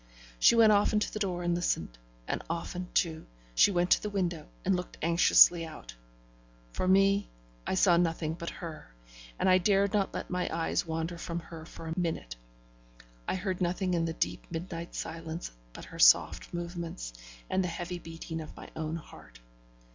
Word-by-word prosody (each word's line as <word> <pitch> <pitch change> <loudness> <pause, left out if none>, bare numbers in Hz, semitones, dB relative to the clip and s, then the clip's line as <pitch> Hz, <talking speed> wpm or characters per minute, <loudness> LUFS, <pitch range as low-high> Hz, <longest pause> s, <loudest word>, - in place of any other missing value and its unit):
She - - +6
went 225 -2 +7
often 205 +1 +3
to - - -2
the 215 - -3
door 180 -3 -2
and 175 0 +1
listened; 80 - -1 0.3
and - - -2
often, 175 +2 -4
too, 160 -2 0 0.3
she - - +6
went 175 -2 0
to - - +6
the 210 - -3
window, 175 -6 -2 0.2
and 190 0 +3
looked 180 0 -5
anxiously 170 0 +6
out. 155 - -9 0.8
For 185 - -2
me, 195 +2 +4 0.4
I - - 0
saw 180 -2 +5
nothing 165 -2 0
but 170 0 -5
her, 155 - -9 0.4
and - - +1
I 185 0 +6
dared 200 +2 +2
not 200 -2 +1
let - - -5
my 180 0 -1
eyes 165 +1 -1
wander 165 +1 -3
from 170 0 -4
her 165 -1 -10
for 165 - -10
a 160 +3 -3
minute; 160 - -2 0.6
and - - -19 0.2
I - - 0
heard 185 -1 -3
nothing 180 +1 0
in 165 -1 +1
the 165 - -2
deep - - -3
midnight 170 0 -5
silence 165 +1 -5 0.2
but - - -10
her - - -11
soft 80 +7 +5
movements, 170 - -5 0.3
and 190 - +1
the - - -1
heavy 175 +1 -5
beating 165 0 -7
of 155 - -10
my - - -10
own 160 0 -3
heart. 160 - -12
170 Hz, 185 wpm, -30 LUFS, 165-185 Hz, 0.8 s, went